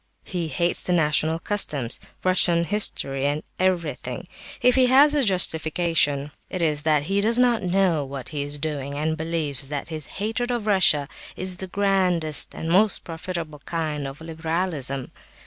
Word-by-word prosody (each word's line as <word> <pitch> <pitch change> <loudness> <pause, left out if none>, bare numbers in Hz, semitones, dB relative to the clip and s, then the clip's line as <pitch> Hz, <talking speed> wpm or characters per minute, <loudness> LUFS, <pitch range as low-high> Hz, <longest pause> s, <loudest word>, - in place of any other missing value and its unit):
He 175 -3 -3
hates 170 +4 0
the 180 - 0
national 160 -1 +2
customs, 150 - +1 0.2
Russian 175 -2 +3
history, 140 -7 +1
and 145 +1 -2 0.2
everything. 170 -7 -1 0.3
If 250 - +4
he 255 0 +4
has 280 +4 +6
a 290 -2 +2
justification, 160 - +1 0.2
it 185 - -4
is 155 -3 +1
that 150 -1 +2
he 195 +6 0
does 230 +3 +3
not 245 -2 +3
know 180 -4 +1
what 135 -1 -6
he 150 -2 -3
is 145 +1 0
doing, 140 -2 -4
and 155 +2 -1
believes 155 -4 -3
that 145 +1 -4
his 155 -3 -5
hatred 225 +5 -2
of 240 -3 -2
Russia 175 -8 +3 0.3
is 185 -1 -2
the 190 - -5
grandest 180 -5 +1
and 160 - -5
most 195 +5 +3
profitable 165 -2 -6
kind 150 -2 -3
of 135 +3 -9
liberalism. 160 -4 -3
165 Hz, 160 wpm, -24 LUFS, 150-190 Hz, 0.3 s, has